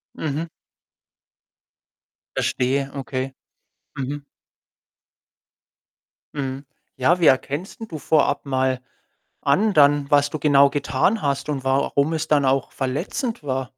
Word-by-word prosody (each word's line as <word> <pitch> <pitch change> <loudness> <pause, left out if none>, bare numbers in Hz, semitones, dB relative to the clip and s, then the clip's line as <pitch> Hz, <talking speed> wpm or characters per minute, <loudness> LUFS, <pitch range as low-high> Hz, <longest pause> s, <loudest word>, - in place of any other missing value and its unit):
Mhm. 155 +2 -3 1.9
Verstehe, 135 +2 0
okay. 135 -1 -4 0.6
Mhm. 140 +2 -4 2.1
Mhm. 135 -1 -4 0.3
Ja, 165 +8 +2
wie 170 - +4
erkennst 145 +7 +1
denn 225 - -7
du 160 -6 -7
vorab 150 +1 +1
mal 130 -1 0 0.6
an 195 +10 +2
dann, 145 -2 +4
was 145 0 +4
du 155 - -5
genau 140 -1 +5
getan 145 +9 0
hast 140 0 -1
und 140 -3 -2
warum 140 +3 +1
es 160 - -2
dann 145 -2 +3
auch 135 0 +1
verletzend 170 - -3
war? 130 -2 -1
140 Hz, 115 wpm, -22 LUFS, 135-150 Hz, 2.1 s, genau